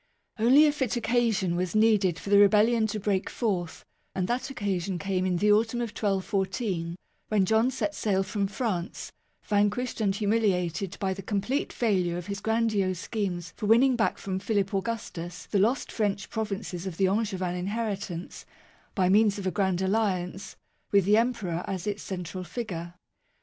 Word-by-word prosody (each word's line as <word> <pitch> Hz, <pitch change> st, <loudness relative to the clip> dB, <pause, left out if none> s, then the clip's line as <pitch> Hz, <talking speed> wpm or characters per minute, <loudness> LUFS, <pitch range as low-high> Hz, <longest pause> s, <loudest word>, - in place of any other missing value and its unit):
Only 260 Hz, +7 st, +6 dB
a 300 Hz, -, +4 dB
fit 265 Hz, -6 st, -1 dB
occasion 230 Hz, -6 st, +1 dB
was 180 Hz, +2 st, -2 dB
needed 210 Hz, -6 st, +3 dB
for 200 Hz, -, -7 dB
the 200 Hz, -, +7 dB
rebellion 220 Hz, +3 st, +5 dB
to 215 Hz, 0 st, -3 dB
break 195 Hz, -2 st, 0 dB
forth; 185 Hz, -8 st, -2 dB, 0.3 s
and 185 Hz, -1 st, 0 dB
that 245 Hz, +3 st, -1 dB
occasion 195 Hz, -7 st, -2 dB
came 185 Hz, 0 st, -1 dB
in 180 Hz, -1 st, +1 dB
the 210 Hz, +4 st, +3 dB
autumn 225 Hz, +3 st, +2 dB
of 240 Hz, -1 st, -2 dB
1214, 190 Hz, -3 st, -1 dB, 0.3 s
when 205 Hz, -3 st, +2 dB
John 220 Hz, +5 st, +3 dB
set 265 Hz, +3 st, -2 dB
sail 195 Hz, -7 st, 0 dB
from 200 Hz, 0 st, -1 dB
France, 195 Hz, -5 st, -3 dB, 0.3 s
vanquished 210 Hz, +4 st, 0 dB
and 195 Hz, -2 st, +1 dB
humiliated 200 Hz, -3 st, 0 dB
by 190 Hz, -1 st, 0 dB
the 195 Hz, -, -7 dB
complete 205 Hz, +8 st, -1 dB
failure 185 Hz, -7 st, 0 dB
of 175 Hz, -, -6 dB
his 200 Hz, 0 st, -4 dB
grandiose 215 Hz, -4 st, +1 dB
schemes 180 Hz, -5 st, -3 dB
for 215 Hz, -, -4 dB
winning 250 Hz, +4 st, +5 dB
back 225 Hz, -2 st, +1 dB
from 190 Hz, -1 st, -3 dB
Philip 200 Hz, -1 st, -1 dB
Augustus 190 Hz, -4 st, -4 dB
the 200 Hz, -, 0 dB
lost 235 Hz, +8 st, +1 dB
French 205 Hz, -3 st, -1 dB
provinces 200 Hz, -4 st, -4 dB
of 175 Hz, -3 st, -6 dB
the 195 Hz, -, +3 dB
Angevin 190 Hz, -3 st, -1 dB
inheritance, 195 Hz, -2 st, -4 dB, 0.5 s
by 185 Hz, -2 st, +2 dB
means 205 Hz, +2 st, +4 dB
of 200 Hz, -, -5 dB
a 185 Hz, -, +1 dB
grand 190 Hz, -2 st, 0 dB
alliance, 190 Hz, -2 st, -1 dB, 0.4 s
with 200 Hz, -3 st, +4 dB
the 210 Hz, +2 st, +5 dB
Emperor 210 Hz, -8 st, 0 dB
as 190 Hz, -1 st, -4 dB
its 205 Hz, -1 st, -2 dB
central 185 Hz, -1 st, -5 dB
figure. 175 Hz, -5 st, -5 dB
200 Hz, 165 wpm, -27 LUFS, 185-220 Hz, 0.5 s, the